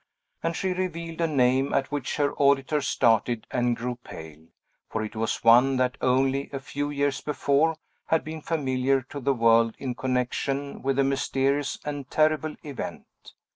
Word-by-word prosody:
And 165 0 -1
she 190 -1 -1
revealed 170 -2 -4
a 165 - +3
name 135 -2 +2
at 135 +1 0
which 145 -3 -2
her 145 -1 +1
auditor 140 +1 +2
started 120 -2 +1
and 120 -1 +1
grew 125 +1 -4
pale; 80 0 -11 0.4
for 110 -1 -2
it 110 - -9
was 110 0 -2
one 125 +4 +6
that, 125 +1 +1
only 135 +2 +1
a 135 - -4
few 145 +2 -4
years 140 -1 -1
before, 150 +2 +1 0.3
had 160 - +2
been 155 0 -7
familiar 135 -4 0
to 145 - -6
the 140 0 +1
world 115 -1 +4
in 130 -2 -3
connection 130 +2 -2
with 135 0 0
a 140 - +4
mysterious 135 +1 0
and 145 -2 -5
terrible 155 0 +1
event. 145 -4 -6
135 Hz, 165 wpm, -26 LUFS, 125-145 Hz, 0.4 s, one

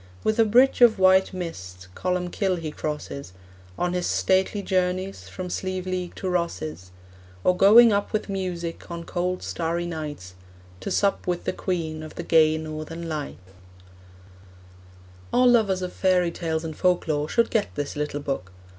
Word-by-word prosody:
With 215 +1 0
a 225 - +6
bridge 250 +5 +4
of 235 -3 +7
white 190 0 +5
mist 95 - -7
Columbkill 180 - -1
he 160 -2 -5
crosses, 150 -8 -5 0.4
On 180 0 0
his 180 -1 -1
stately 190 +2 +1
journeys 185 0 -1
From 185 -1 -6
Slieveleague 185 -1 -3
to 190 - -5
Rosses; 90 - -3 0.5
Or 180 - +3
going 220 +4 +7
up 200 0 0
with 215 - -1
music, 180 -4 -4
On 170 -1 -5
cold 180 +1 -2
starry 170 +1 -2
nights, 150 - -6 0.5
To 95 - -5
sup 200 -1 +1
with 175 -1 -1
the - - -1
Queen 160 -4 -3
Of 155 0 -9
the - - -5
gay 155 -1 +4
Northern 160 +1 -6
Lights. 145 - -6 1.8
All 250 - +4
lovers 210 -6 +3
of 180 - -4
fairy 180 -2 +2
tales 160 -1 -3
and 160 -1 -5
folklore 160 -4 +1
should 235 -1 +2
get 220 -3 +1
this 145 -1 -3
little 150 0 -3
book. 135 -11 -4
175 Hz, 155 wpm, -25 LUFS, 155-190 Hz, 1.8 s, of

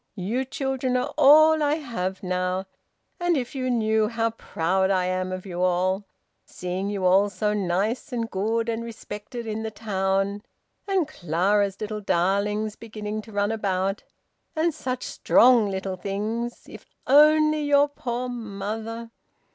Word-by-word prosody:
You 225 +7 -2
children 265 -2 -1
are 250 - -2
all 310 +3 +7
I 295 0 +2
have 200 - -4
now. 185 +1 -1 0.5
And 350 -2 +2
if 250 +2 -3
you 255 -2 -2
knew 220 -2 +2
how 230 0 -1
proud 190 -3 0
I 185 -2 +2
am 185 0 -1
of 185 +1 -5
you 180 -2 -5
all, 185 +2 +1 0.4
seeing 180 +2 -4
you 200 -2 -2
all 195 +3 +5
so 210 +1 -1
nice 205 +7 -1
and 230 -2 -2
good, 225 +3 -1
and 230 0 -2
respected 230 +1 -7
in 220 0 -3
the 220 - -3
town, 195 -1 -1 0.5
and 380 -6 +1
Clara's 195 - 0
little 215 0 -4
darlings 205 +4 0
beginning 215 -1 -6
to 220 - -14
run 205 +1 0
about, 195 -2 -1 0.5
and 320 +1 +1
such 255 -4 -4
strong 235 -4 +4
little 190 -1 -3
things. 215 +5 -3
If - - -12 0.2
only 305 +2 +5
your 290 0 +4
poor 250 -3 -4
mother 225 0 -5
215 Hz, 145 wpm, -25 LUFS, 195-245 Hz, 0.5 s, all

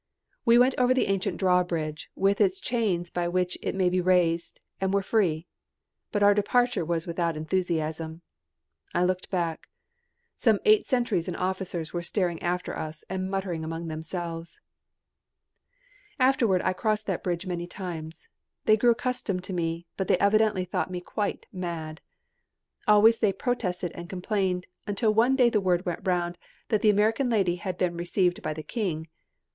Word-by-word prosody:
We 235 -1 +6
went 250 +2 +5
over 250 0 +4
the 260 - +2
ancient 195 -2 -1
drawbridge, 175 -5 0
with 195 +2 +2
its 190 -2 +3
chains 190 -7 -1
by 175 -1 -1
which 180 0 0
it - - -2
may 190 -2 +2
be 180 +1 +2
raised, 175 -2 +2 0.2
and 190 0 0
were 200 0 +1
free. 180 -7 +1 0.7
But 205 -1 +1
our 205 0 +7
departure 245 +2 +2
was 165 0 -1
without 170 -2 -1
enthusiasm. 160 -1 -2 0.7
I 175 - +3
looked 185 0 -1
back. 170 -4 -2 0.7
Some - - +3
eight 430 -1 +5
sentries 240 -9 +1
and 180 - -3
officers 185 -3 -3
were 175 - -1
staring 175 -1 -1
after 180 +1 -2
us 155 0 -6
and 190 0 -2
muttering 190 -4 -2
among 165 +1 -4
themselves. 165 +1 -6 1.6
Afterward 245 -8 +3
I 185 - +1
crossed 215 +2 0
that 190 -4 -2
bridge 175 +1 -2
many 175 -1 -3
times. 170 -4 -7 0.4
They 215 - +5
grew 240 +3 +4
accustomed 230 -6 -1
to 190 - -5
me, 165 -1 -2
but 190 - -1
they - - +4
evidently 205 -1 +3
thought 180 - -2
me 180 -1 -4
quite 205 +3 -3
mad. 170 -4 -5 0.9
Always 215 +2 +6
they 210 -3 +3
protested 185 -9 -2
and 170 0 -8
complained, 185 -1 -1 0.2
until 215 +2 +1
one 240 +5 +4
day 245 -3 +4
the 210 - +2
word 180 -1 +1
went 175 -2 -2
round 175 -1 0 0.3
that 215 -2 +2
the 215 - +5
American 220 +5 +2
lady 190 -6 +2
had 185 -1 -4
been 180 -2 0
received 175 +1 0
by 155 - -3
the 155 - -6
King. 165 -4 -3
185 Hz, 165 wpm, -27 LUFS, 170-205 Hz, 1.6 s, our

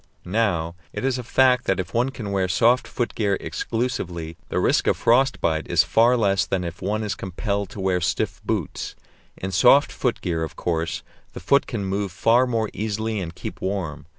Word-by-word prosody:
Now, 90 -5 0 0.2
it - - -3
is 130 -1 0
a - - -5
fact 125 +1 +3
that 95 0 +1
if 95 -1 -4
one 120 +3 +2
can 110 -6 -6
wear 95 -1 +1
soft 120 +7 +3
foot 120 - -2
gear 100 -3 0
exclusively 85 -3 -3
the - - -2
risk - - +2
of - - +3
frost 130 +3 +3
bite 80 -1 0
is - - +4
far 120 +2 +4
less 100 -4 +2
than 95 -2 -1
if 85 +1 -6
one 105 +3 -1
is 105 -1 -1
compelled 100 0 -3
to - - -9
wear 95 -2 +1
stiff 85 - -1
boots; - - -3 0.4
in 95 - -4
soft 95 +10 +5
foot 125 -3 -1
gear, 85 -3 -1
of 80 - -4
course, 80 -1 -2 0.3
the - - -7
foot 140 - +2
can 105 -5 -3
move 100 0 -2
far 115 +7 +3
more 115 -3 -1
easily 110 +1 -2
and 85 -3 -5
keep - - -7
warm. 90 -7 -3
100 Hz, 200 wpm, -23 LUFS, 90-115 Hz, 0.4 s, soft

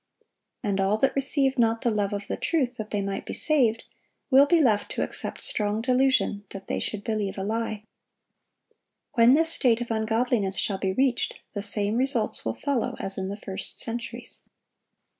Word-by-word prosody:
And 200 -3 0
all 195 +2 +2
that 270 - +1
"received 270 -1 +2
not 230 -1 +2
the 240 - +1
love 205 -2 0
of 205 0 -4
the - - -3
truth, 265 -7 -1
that 215 -1 -5
they 205 -1 -1
might 195 0 -3
be - - -6
saved," 240 -7 +2 0.5
will 275 +2 +7
be 335 +3 +4
left 225 -9 +2
to - - -1
accept - - -4
"strong 210 0 -1
delusion, 255 -4 +2
that 195 -1 -9
they - - -2
should 205 -1 -3
believe 210 -3 -2
a 190 - -3
lie."(747) 215 0 -2 1.3
When 235 -1 +6
this 325 +1 +4
state 235 -4 +3
of 240 -1 -4
ungodliness 220 -2 0
shall 195 -2 0
be 190 -1 -1
reached, 255 +1 +1 0.2
the 205 - -3
same 205 +1 0
results 255 -3 0
will 110 - -2
follow 280 -5 -1
as 195 0 -1
in 190 0 -3
the 200 - -5
first 190 -2 -5
centuries. 235 +1 -4
225 Hz, 180 wpm, -26 LUFS, 205-255 Hz, 1.3 s, will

